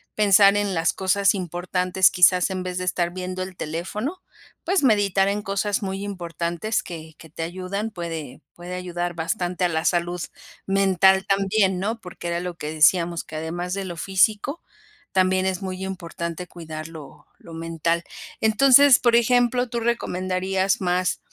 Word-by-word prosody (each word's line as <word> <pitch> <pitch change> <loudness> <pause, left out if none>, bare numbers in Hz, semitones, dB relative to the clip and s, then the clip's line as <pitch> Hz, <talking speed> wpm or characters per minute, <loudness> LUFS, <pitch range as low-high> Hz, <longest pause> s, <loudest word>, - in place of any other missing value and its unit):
pensar 200 -1 +6
en 205 -2 0
las 165 0 +1
cosas 195 +1 +2
importantes. 180 +1 +1
Quizás, 180 +1 +4
en 185 -1 -3
vez 180 -1 -4
de 185 - -3
estar 175 -1 0
viendo 185 0 -4
el 185 -1 -9
teléfono, 210 - -4 0.4
pues, 370 -3 +1
meditar 200 -5 +3
en 205 +1 -1
cosas 200 +1 -1
muy 195 +1 -4
importantes 175 +1 -3
que 160 -2 -9
que 160 - -14
te 165 +2 -6
ayudan, 185 +5 -4
puede 165 -7 -6
puede 175 +1 -8
ayudar 175 -1 -3
bastante 180 +1 -1
a 175 - +1
la 160 +1 -2
salud 175 0 0 0.4
mental 190 0 +3
también, 195 -1 +2
¿no? 220 +4 -2
Porque 180 -2 -8
era 170 0 -1
lo 175 -1 -5
que 150 +1 -5
decíamos 170 +2 +3
que 155 - -11
además 175 +3 -4
de 195 -1 -3
lo 175 -2 -7
físico, 210 - +1 0.5
también 185 0 +2
es 190 +1 -1
muy 190 0 -5
importante 175 -2 -5
cuidar 160 -2 -8
lo 155 -4 -12
lo 165 - -13
mental. 165 +1 -2 0.4
Entonces, 260 +5 +6
por 240 -1 +3
ejemplo, 245 +1 +2
¿tú 235 0 -3
recomendarías 190 -4 -1
más 180 0 0
185 Hz, 160 wpm, -23 LUFS, 170-200 Hz, 0.5 s, pensar